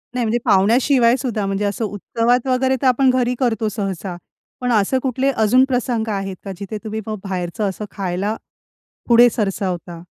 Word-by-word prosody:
नाही, 245 -2 0
म्हणजे 230 +2 0
पाहुण्याशिवाय 235 +5 +4
सुद्धा, 235 -5 -2
म्हणजे 195 +1 -1
असं 205 +3 -1
उत्सवात 230 +5 0
वगैरे 260 +1 +2
तर 265 - +2
आपण 260 +1 +4
घरी 250 -1 +1
करतो 225 -4 0
सहसा. 195 -3 -4 0.5
पण 250 0 0
असं 225 +4 +2
कुठले 265 +1 0
अजून 240 +1 +4
प्रसंग 245 -3 -1
आहेत 195 -1 -3
का, 195 - -4
जिथे 200 +2 -6
तुम्ही 220 0 -4
मग 215 -1 -4
बाहेरचं 190 +1 -2
असं 200 +3 -6
खायला 195 +2 -2 0.7
पुढे 240 0 +7
सरसावता? 185 -5 -3
220 Hz, 165 wpm, -20 LUFS, 195-250 Hz, 0.7 s, पुढे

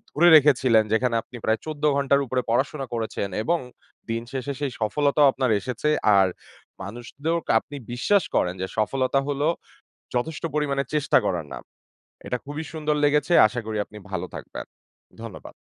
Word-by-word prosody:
ধরে 170 +3 +5
রেখেছিলেন 130 -6 +5
যেখানে 120 0 +1
আপনি 125 - -15
প্রায় 110 0 +1
১৪ 150 -1 -6
ঘন্টার 140 0 +3
উপরে 125 +1 -1
পড়াশোনা 135 +3 0
করেছেন 110 -3 -3
এবং 170 +6 +1 0.5
দিন 115 0 -1
শেষে 135 +1 -3
সেই 140 -3 -2
সফলতাও 140 +7 +3
আপনার 130 -3 0
এসেছে। 125 +7 -2 0.3
আর 95 -1 +5 0.6
মানুষদের 140 - -4
আপনি 145 - -12 0.2
বিশ্বাস 190 +9 +2
করেন 90 - +2
যে 95 - -2
সফলতা 130 +5 +1
হলো 145 +2 0 0.7
যথেষ্ট 145 +6 -2
পরিমাণে 140 -2 0
চেষ্টা 150 -2 +3
করার 85 -5 -1
নাম। - - -7 0.6
এটা 125 - -2
খুবই 145 +3 -5
সুন্দর 155 -1 -1
লেগেছে। 150 +3 +2
আশা 120 +2 -3
করি 110 -1 -3
আপনি 105 - -15
ভালো - - -3
থাকবেন। - - -7 0.6
ধন্যবাদ। 115 -5 -9
135 Hz, 155 wpm, -24 LUFS, 115-150 Hz, 0.7 s, ধরে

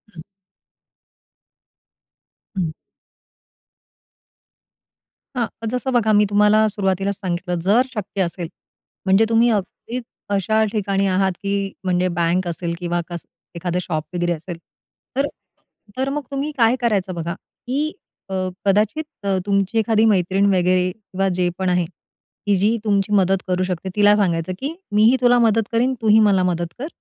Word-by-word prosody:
हं. 160 - -9 2.3
हं. 165 -4 -1 2.6
हां, 235 -2 +1 0.2
जसं 250 +2 -2
बघा 225 -3 +3
मी 210 0 +5
तुम्हाला 210 +1 +4
सुरुवातीलाच 195 -1 -1
सांगितलं, 180 -1 -3
जर 200 +8 +4
शक्य 205 -2 -3
असेल, 175 -1 -2 0.6
म्हणजे 195 +3 +4
तुम्ही 230 +1 +4
अगदीच 225 +4 -3 0.3
अशा 215 +3 +2
ठिकाणी 200 -2 0
आहात, 190 0 +2
की 200 0 -1
म्हणजे 180 -1 +1
बँक 175 +2 +1
असेल 170 0 -3
किंवा 175 -1 -1
कसं 170 -1 -7 0.3
एखादं 175 +1 -2
शॉप 155 -3 -3
वगैरे 175 0 0
असेल. 170 +2 -7 0.6
तर 275 +2 +2 0.7
तर 265 +1 0
मग 295 +2 -2
तुम्ही 280 +2 -2
काय 230 0 +4
करायचं 200 -6 0
बघा, 170 0 -3
की 275 - -4 0.4
अ, - - -5 0.3
कदाचित 210 +10 +2 0.2
अ, 195 -1 +1
तुमची 200 +2 +1
एखादी 220 0 +2
मैत्रीण 195 -2 +2
वगैरे 180 0 +2
किंवा 195 -1 -3
जे 180 -1 +2
पण 190 -1 0
आहे, 180 -1 +2 0.6
की 205 -1 +3
जी 210 +5 +2
तुमची 205 -1 +1
मदत 195 -1 +4
करू 185 0 +1
शकते. 185 0 -3
तिला 205 0 +5
सांगायचं, 180 -3 0
की 280 +3 -3 0.2
"मी 210 +1 +3
ही 240 +4 +6
तुला 245 0 +5
मदत 225 -1 +3
करीन, 245 +3 +2
तू 225 - -1
ही 215 +1 +7
मला 190 -2 +3
मदत 175 -1 0
कर, 280 - -3
195 Hz, 145 wpm, -21 LUFS, 180-220 Hz, 2.6 s, ही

